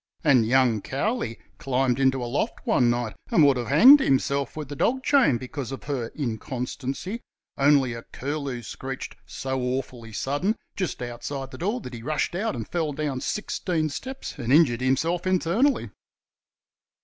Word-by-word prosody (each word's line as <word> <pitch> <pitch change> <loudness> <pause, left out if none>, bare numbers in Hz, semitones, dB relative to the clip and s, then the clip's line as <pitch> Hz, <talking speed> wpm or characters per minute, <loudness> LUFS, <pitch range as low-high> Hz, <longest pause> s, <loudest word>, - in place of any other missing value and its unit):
And 130 -8 +4
young 125 -3 +3
Cowley 135 - -2 0.2
climbed 130 -1 +1
into 130 -1 +2
a - - -2
loft 120 +4 -2
one 120 - +3
night 120 -2 -1
and 160 - +5
would 140 -2 +5
have 120 -2 -3
hanged 250 - +9
himself 140 - 0
with 150 -2 -4
the 145 - -5
dog 260 - +1
chain 265 - +4
because 130 0 -6
of 135 - -6
her 135 -5 -2
inconstancy, 130 - -4 0.3
only 140 -3 +4
a 115 - -6
curlew 140 -2 -4
screeched 130 +5 -6
"so 130 -1 -3
awfully 125 -2 -3
sudden" 145 - -1 0.2
just 185 -9 -3
outside 130 +3 -5
the 130 - -9
door 210 +8 -1
that 125 - -8
he 115 - -7
rushed 150 +6 -1
out 195 -2 -1
and 115 -3 -5
fell 160 -4 -1
down 140 -3 -2
sixteen 170 -6 -1
steps 265 - -7
and 120 +1 -2
"injured 135 -6 +5
himself 165 +8 +1
internally". 185 - +2
135 Hz, 160 wpm, -25 LUFS, 125-165 Hz, 0.3 s, hanged